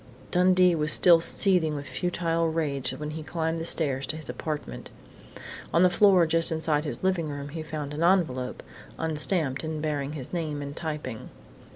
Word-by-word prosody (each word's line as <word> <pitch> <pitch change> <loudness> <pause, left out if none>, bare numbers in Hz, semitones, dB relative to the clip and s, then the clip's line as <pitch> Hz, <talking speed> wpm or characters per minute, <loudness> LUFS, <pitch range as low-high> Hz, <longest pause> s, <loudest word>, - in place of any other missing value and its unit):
Dundee 180 0 +4
was 155 -2 +2
still 170 +1 +6
seething 170 -4 +2
with 145 -1 -6
futile 165 +2 -1
rage 150 -5 -2
when 150 0 -6
he 160 +1 -6
climbed 160 +1 -3
the 165 - -4
stairs 140 -5 0
to - - -3
his 155 -5 -6
apartment. 145 - -6 0.8
On 170 - +4
the 180 - +4
floor 185 -2 +5
just 165 +2 0
inside 160 -1 0
his 145 - -6
living 180 -4 0
room 145 -1 -6
door - - -13
he 165 - -5
found 150 -2 -6
an 150 - -5
envelope 165 -9 +1 0.3
unstamped 155 -3 +1
and 160 -1 -4
bearing 150 -2 -3
his 145 0 -8
name 155 -4 -3
in 140 0 -7
typing. 150 -8 -6
155 Hz, 180 wpm, -26 LUFS, 145-170 Hz, 0.8 s, still